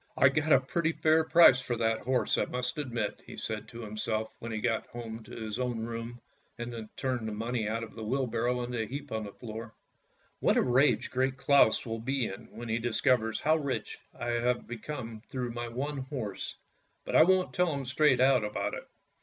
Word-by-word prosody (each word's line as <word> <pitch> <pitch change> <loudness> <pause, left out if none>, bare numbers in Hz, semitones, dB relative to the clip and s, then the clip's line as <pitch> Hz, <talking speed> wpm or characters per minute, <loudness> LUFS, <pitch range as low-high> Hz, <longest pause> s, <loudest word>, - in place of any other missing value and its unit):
" - - -35
I 130 - +7
got 150 +3 0
a 135 - +8
pretty 165 +5 -1
fair 160 0 +3
price 160 -5 +7
for 120 -1 -2
that 115 -1 +1
horse 125 -4 +1
I - - +1
must 125 +3 -2
admit! 120 -7 -3
" - - -9
said - - -3
he - - -17
to 120 - -9
himself 110 0 -2
when 115 - -6
he 110 - -2
got 115 -1 0
home 115 -1 -7
to - - -14
his 110 0 -4
own 125 -3 -1
room 115 +1 -6 0.4
and 120 -2 -6
turned 125 -4 -1
the - - -3
money 115 +1 -2
out 115 +1 -2
of 115 - -9
the 110 - -7
wheelbarrow 125 0 0
into 120 -1 -2
a 110 - -3
heap 140 +1 -6
on 110 -1 -2
the 100 - -7
floor. 115 +1 -8 0.3
" - - -39
What - - +3
a - - +4
rage 130 +3 +3
Great 130 +1 0
Claus 135 -4 +4
will 115 -1 -3
be 130 +2 -1
in 95 - -7
when 120 +1 -8
he 115 +1 0
discovers 115 -1 +1
how 155 +2 +4
rich 140 -4 -3 0.2
I 120 - -2
am 120 +1 +1
become 120 -2 -6
through 125 -2 -3
my 120 0 -4
one 135 +5 -3
horse, 130 -7 -5 0.5
but - - -3
I - - +9
won't 185 +2 +4
tell 180 -2 +2
him 140 -2 -3
straight 130 0 +3
out 130 -2 +5
about 105 0 -2
it." - - -6
120 Hz, 220 wpm, -30 LUFS, 115-135 Hz, 0.5 s, I